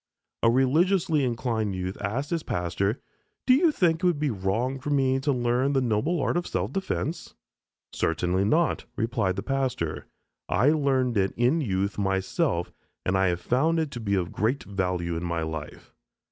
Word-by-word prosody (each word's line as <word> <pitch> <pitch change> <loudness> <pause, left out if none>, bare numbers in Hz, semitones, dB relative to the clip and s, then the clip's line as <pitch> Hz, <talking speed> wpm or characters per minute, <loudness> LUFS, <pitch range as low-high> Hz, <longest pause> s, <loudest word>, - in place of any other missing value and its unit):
A 115 - +5
religiously 155 +5 +3
inclined 115 -4 -1
youth 95 +1 -3
asked 120 - -2
his 170 -1 0
pastor, 95 - -1 0.5
"Do 255 - +6
you 315 +5 +4
think 170 - +2
it 175 - -18
would 175 -4 +3
be 150 -2 0
wrong 110 +7 -1
for 140 - -5
me 135 -2 +2
to 140 +2 0
learn 125 +2 +1
the 135 - +3
noble 125 +9 0
art 140 - 0
of 175 - -2
self - - -2
defense?" 190 -4 -3 0.6
"Certainly 90 +4 0
not," 160 +10 +1
replied 110 -5 0
the - - -4
pastor, 130 - -2 0.4
"I 115 +10 +3
learned 135 -6 +1
it 95 -1 +1
in 125 +8 +2
youth 100 -4 -1
myself, 95 - 0 0.3
and 95 - +1
I 95 0 +3
have 90 0 -1
found 155 - +2
it 155 -4 -2
of 100 -6 -1
great 115 +6 0
value 90 -3 -2
in 85 - -3
my 85 -2 -1
life." 80 -1 -7
120 Hz, 170 wpm, -26 LUFS, 95-145 Hz, 0.6 s, Do